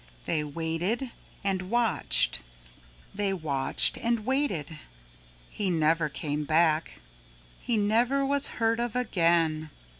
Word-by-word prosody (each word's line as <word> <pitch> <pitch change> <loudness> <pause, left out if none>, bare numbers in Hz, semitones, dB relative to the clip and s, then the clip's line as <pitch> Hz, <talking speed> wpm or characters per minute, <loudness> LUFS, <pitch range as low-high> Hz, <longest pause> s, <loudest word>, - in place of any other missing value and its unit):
They 155 -2 0
waited 165 - -2 0.3
and 190 -2 -2
watched, 225 - +3 0.7
they 200 -1 -1
watched 140 -6 +2
and 235 -2 -1
waited. 210 - -1 0.7
He 200 -2 -1
never 160 -1 +1
came 150 +1 -3
back. 160 +1 +1 0.6
He 235 - 0
never 235 +7 +2
was 280 0 +1
heard 230 0 +1
of 240 -1 -2
again. 165 -9 +1
185 Hz, 110 wpm, -27 LUFS, 155-235 Hz, 0.7 s, watched